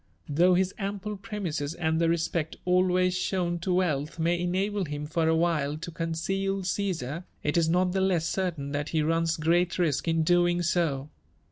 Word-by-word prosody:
Though 175 +5 +4
his 190 +1 +1
ample 205 +1 -3
premises 180 -8 -4
and 160 -1 0
the 165 - +3
respect 165 -1 -1
always 180 0 +3
shown 180 -1 -1
to 180 +2 -2
wealth 165 -4 0
may 170 +1 +1
enable 190 +3 0
him 145 -1 -5
for 160 +1 0
a 160 - +3
while 155 -3 +1
to 170 +2 -7
conceal 190 +4 -2
Csesar, 175 -4 -2 0.2
it 150 - 0
is 165 -2 +3
not 180 +2 +2
the 190 +1 0
less 180 -4 +2
certain 160 -7 -2
that 145 +1 -2
he 155 -2 +1
runs 165 +1 +1
great 170 +3 +2
risk 170 -4 0
in 165 -1 +2
doing 175 +1 +3
so. 155 -5 0
170 Hz, 175 wpm, -27 LUFS, 160-185 Hz, 0.2 s, Though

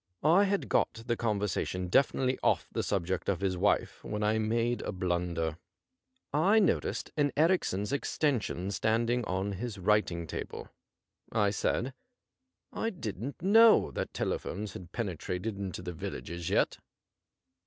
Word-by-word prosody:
I 175 +6 +6
had 200 0 0
got 115 -1 +1
the 120 - +1
conversation 100 -5 -1
definitely 130 +5 +2
off - - +2
the - - -1
subject 95 -2 -1
of 95 -3 +1
his 95 -2 0
wife 100 +3 +1
when 105 0 -3
1 110 +1 +1
made 115 +2 +1
a - - -3
blunder. 85 -3 -1 0.7
I 185 +9 +4
noticed 200 -7 +1
an 145 -1 +2
Erichsen's 150 - +2
extension 125 - -1
standing 115 +4 +1
on 95 +2 -1
his 105 +2 -5
writinff 95 -4 +1
table. - - -6 0.6
I 105 -2 +2
said: 120 +5 -1 0.4
' 260 0 -40
I 225 - +2
didn't 135 - -6
know 225 +4 +6
that - - -3
telephones 100 0 -3
had 90 -1 -9
penetrated 100 0 -3
into 95 -2 -4
the 90 -1 -5
villages 85 +1 -5
yet.' - - +1
105 Hz, 140 wpm, -30 LUFS, 95-130 Hz, 0.7 s, I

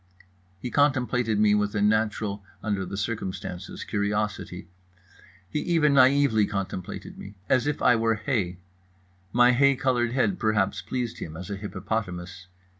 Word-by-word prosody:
He 120 +6 -6
contemplated 125 -6 +2
me 105 0 +4
with 105 0 0
a - - +1
natural, 105 -1 0 0.2
under 100 -3 -1
the 100 - -5
circumstances, 100 -4 -4
curiosity. 100 -3 -2 0.8
He 150 - -2
even 155 -3 +2
naively 130 -5 +5
contemplated 95 -3 -5
me. 100 +1 -10
As 130 +1 +2
if 150 - -2
I 125 - +6
were 115 0 +2
hay. 105 -7 -1 0.7
My 120 +1 +5
hay 140 +2 +4
coloured 125 -2 0
head 180 +8 +1
perhaps 105 -3 +1
pleased 125 -2 -4
him, 80 0 -7
as 90 +4 -7
a - - -2
hippopotamus. 95 -2 -5
110 Hz, 140 wpm, -26 LUFS, 100-125 Hz, 0.8 s, I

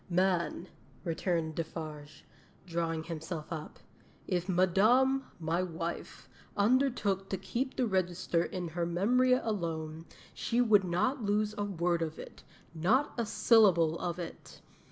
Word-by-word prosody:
'"Man," 180 -1 +1 0.4
returned 165 -2 -1
Defarge, 155 -2 -7 0.4
drawing 165 -2 -2
himself 160 0 -5
up, 155 -1 -7 0.5
"if 180 -1 -1
Madame, 220 +10 +3
my 165 +2 0
wife, 170 -1 -5 0.3
undertook 210 -4 +2
to 190 - -1
keep 250 +8 -3
the 255 - +1
register 180 -4 0
in 180 -2 -4
her 170 +1 -2
memory 245 +9 +3
alone, 165 -9 -2 0.3
she 235 - -1
would 215 -5 +5
not 235 +10 0
lose 210 0 +1
a 205 - -2
word 175 -3 0
of 160 -1 -3
it - - -10 0.3
not 215 - +2
a 235 -3 -2
syllable 185 -8 +4
of 175 -1 -3
it. 175 -2 -8
180 Hz, 130 wpm, -31 LUFS, 165-210 Hz, 0.5 s, would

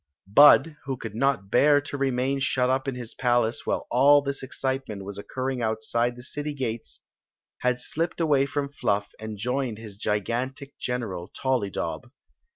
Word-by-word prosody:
Bud, 145 +8 +7
who 135 -1 -3
could 115 -3 -7
not 115 -4 0
bem 145 +3 +5
to 145 - -6
remain 135 0 0
shut 130 -1 +1
up 130 +1 0
in 135 - -2
his 120 -2 -7
palace 120 -2 +1
while - - -1
all 140 +3 +6
this 140 0 -3
excitement 130 -6 -3
was 100 0 -6
occurring 130 +4 -3
outside 115 +2 0
the 125 - -11
city 145 +2 -4
gates, 120 -4 -4 0.6
had 125 0 +1
slipped 165 +7 -2
away 145 -4 +3
from 140 0 -2
Fluff 100 -5 -1
and 110 -1 -6
joined 125 +1 -2
his 105 -3 -10
gigantic 120 +7 -2
|^eral, 105 -8 -4
Tollydob. 120 -4 -2
125 Hz, 160 wpm, -26 LUFS, 110-140 Hz, 0.6 s, Bud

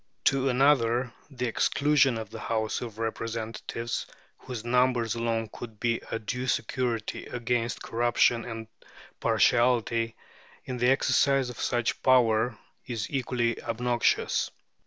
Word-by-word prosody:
To 135 0 +3
another 125 -2 +3 0.2
the 125 -3 -3
exclusion 140 +2 +2
of 110 -2 -6
the 110 - -7
House 110 0 -1
of 115 -3 -7
Representatives, 115 +1 -4 0.3
whose 120 -3 -7
numbers 125 -2 +2
alone 115 -1 -1
could 110 -3 -9
be 115 -1 0
a - - -1
due 125 +3 -4
security 115 -2 -2
against 120 -1 -2
corruption 120 0 +2
and 115 -1 -6 0.5
partiality 115 -2 +2 0.5
in 125 - -4
the 125 +1 +3
exercise 135 -1 +3
of 115 - -12
such 120 -1 +1
a - - -13
power, 120 -3 +3 0.3
is 115 -5 -4
equally 120 -3 -1
obnoxious. 120 +1 +1
120 Hz, 125 wpm, -28 LUFS, 115-125 Hz, 0.5 s, To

